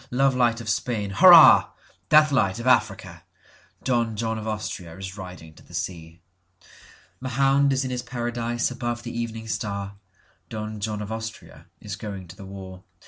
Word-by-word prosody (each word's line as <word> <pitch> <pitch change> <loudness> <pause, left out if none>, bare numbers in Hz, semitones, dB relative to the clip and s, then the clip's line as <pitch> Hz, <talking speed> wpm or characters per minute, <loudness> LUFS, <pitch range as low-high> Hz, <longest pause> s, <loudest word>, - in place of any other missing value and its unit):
Love 135 +2 +2
light 120 -2 +2
of 115 - -9
Spain—hurrah! 120 - +6 0.4
Death 150 0 +6
light 110 -7 +1
of 120 - -6
Africa! 125 -4 +1 0.6
Don 120 -3 0
John 110 0 -2
of 110 - -7
AustriaIs 95 -3 -6
riding 90 -5 -10
to - - -18
the - - -13
sea. 85 -1 -6 1.0
Mahound 135 +2 +2
is 135 0 0
in 130 - -4
his 125 -1 -2
paradise 120 -1 -2
above 120 -1 -4
the 120 - -7
evening 115 -1 -5
star,(Don 100 +1 -7
John 105 0 -3
of 105 - -8
Austria 110 0 -8
is - - -6
going 100 -4 -7
to 90 - -11
the 95 - -11
war.) 95 -1 -10
110 Hz, 150 wpm, -24 LUFS, 100-125 Hz, 1.0 s, Spain—hurrah